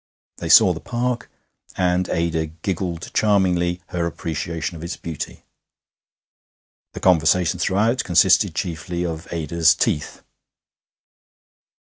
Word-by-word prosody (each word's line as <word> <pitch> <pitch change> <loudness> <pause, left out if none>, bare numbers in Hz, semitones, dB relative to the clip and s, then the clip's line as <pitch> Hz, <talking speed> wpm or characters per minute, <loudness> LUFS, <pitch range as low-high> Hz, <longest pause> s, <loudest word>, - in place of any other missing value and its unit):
They - - -5
saw - - +7
the - - -7
Park, 120 -1 -3 0.5
and 90 0 +1
Ada 80 -1 -1
giggled 85 +1 -5
charmingly 90 -4 +1
her 85 -1 -1
appreciation 85 +2 -4
of 80 - -9
its 85 +1 -5
beauty. 80 -3 -7 1.5
The - - -7
conversation 90 0 +3
throughout 110 +6 +1
consisted 90 0 +3
chiefly 85 0 -3
of 80 -1 -6
Ada's 80 0 +2
teeth. 75 - -2
85 Hz, 105 wpm, -21 LUFS, 80-95 Hz, 1.5 s, saw